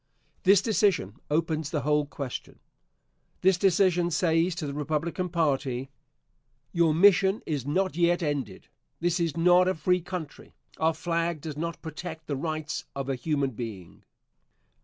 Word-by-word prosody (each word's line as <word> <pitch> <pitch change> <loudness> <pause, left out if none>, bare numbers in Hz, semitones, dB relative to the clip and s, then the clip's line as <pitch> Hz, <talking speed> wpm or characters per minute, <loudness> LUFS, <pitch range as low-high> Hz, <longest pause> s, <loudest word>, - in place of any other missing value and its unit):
This 195 +1 +5
decision 195 - +1
opens 155 -1 0
the 150 -2 -1
whole 150 +1 +1
question. 140 -4 -6 0.8
This 190 +1 +5
decision 180 -2 +3
says 165 0 +2
to 175 -3 -4
the 140 - -4
Republican 155 +5 -2
party, 135 -6 -1 0.8
"Your 170 -2 +3
mission 195 +4 +4
is 145 -4 -3
not 185 +5 0
yet 175 0 +2
ended. 135 -10 -3 0.3
This 175 +1 0
is 165 -2 -1
not 180 +2 +5
a 185 - +1
free 180 +3 +1
country. 170 -4 -7 0.2
Our 160 0 +1
flag 170 0 -1
does 155 -2 -6
not 170 +2 -4
protect 160 0 -7
the 145 - -2
rights 155 +1 -3
of 135 0 -4
a 135 - 0
human 140 0 -1
being." 110 -7 -8
160 Hz, 145 wpm, -27 LUFS, 145-175 Hz, 0.8 s, This